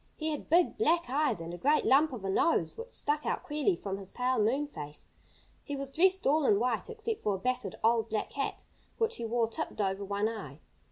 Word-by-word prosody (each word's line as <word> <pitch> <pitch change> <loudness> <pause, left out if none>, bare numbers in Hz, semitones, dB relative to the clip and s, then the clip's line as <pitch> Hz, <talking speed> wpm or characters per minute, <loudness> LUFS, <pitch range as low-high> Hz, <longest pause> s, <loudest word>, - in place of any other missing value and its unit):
He 315 0 -2
had 300 - -5
big, 345 +5 +3
black 340 - +2
eyes 275 - +1
and 165 +1 -6
a 175 - -7
great 295 +3 +3
lump 290 +3 +5
of 225 -7 -6
a - - -1
nose, 330 - +2
which 465 +2 -8
stuck 300 +1 -1
out - - -2
queerly 300 +6 +1
from 195 -9 -5
his 195 -1 -7
pale 250 0 0
moon 250 +8 +2
face. 150 - -8 0.5
He 285 - -4
was 275 0 -5
dressed 375 +5 +3
all 305 +3 +4
in 205 - +4
white, 245 - -1
except 450 -1 -3
for 205 -2 0
a - - -3
battered, 250 -2 -2
old, 225 0 +3
black 215 -1 -2
hat, 275 - -3 0.3
which 455 0 0
he 235 - -4
wore 230 0 +1
tipped 225 - -5
over 195 0 0
one 200 +2 0
eye. 195 -11 -6
255 Hz, 225 wpm, -31 LUFS, 210-310 Hz, 0.5 s, lump